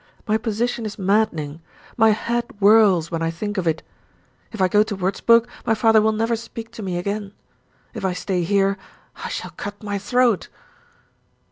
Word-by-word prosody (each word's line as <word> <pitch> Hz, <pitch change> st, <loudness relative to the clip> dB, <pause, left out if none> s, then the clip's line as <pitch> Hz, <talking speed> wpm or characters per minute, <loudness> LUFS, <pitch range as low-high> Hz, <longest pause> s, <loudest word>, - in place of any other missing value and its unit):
My 215 Hz, -, +2 dB
position 230 Hz, +2 st, -1 dB
is 215 Hz, -1 st, -5 dB
maddening; 185 Hz, -7 st, 0 dB, 0.3 s
my 225 Hz, -2 st, +5 dB
head 235 Hz, +2 st, 0 dB
whirls 200 Hz, -5 st, +5 dB
when 165 Hz, -1 st, -2 dB
I 165 Hz, -, 0 dB
think 205 Hz, +5 st, -3 dB
of 175 Hz, -, -2 dB
it. 160 Hz, 0 st, 0 dB, 0.7 s
If 220 Hz, -, -8 dB
I 185 Hz, -, +4 dB
go 205 Hz, +3 st, +4 dB
to 215 Hz, -1 st, -1 dB
Wurzburg, 225 Hz, +5 st, +3 dB, 0.2 s
my 225 Hz, -, +1 dB
father 220 Hz, 0 st, +4 dB
will 220 Hz, +1 st, +3 dB
never 225 Hz, +2 st, 0 dB
speak 230 Hz, 0 st, -8 dB
to 230 Hz, -, -9 dB
me 185 Hz, -3 st, -3 dB
again. 200 Hz, +2 st, -3 dB, 0.6 s
If -, -, -7 dB
I 190 Hz, -1 st, 0 dB
stay 180 Hz, 0 st, -2 dB
here, 195 Hz, +2 st, +1 dB, 0.4 s
I -, -, -4 dB
shall -, -, -5 dB
cut 205 Hz, +1 st, -8 dB
my 205 Hz, -1 st, -3 dB
throat." 240 Hz, 0 st, +2 dB
205 Hz, 175 wpm, -22 LUFS, 190-225 Hz, 0.7 s, my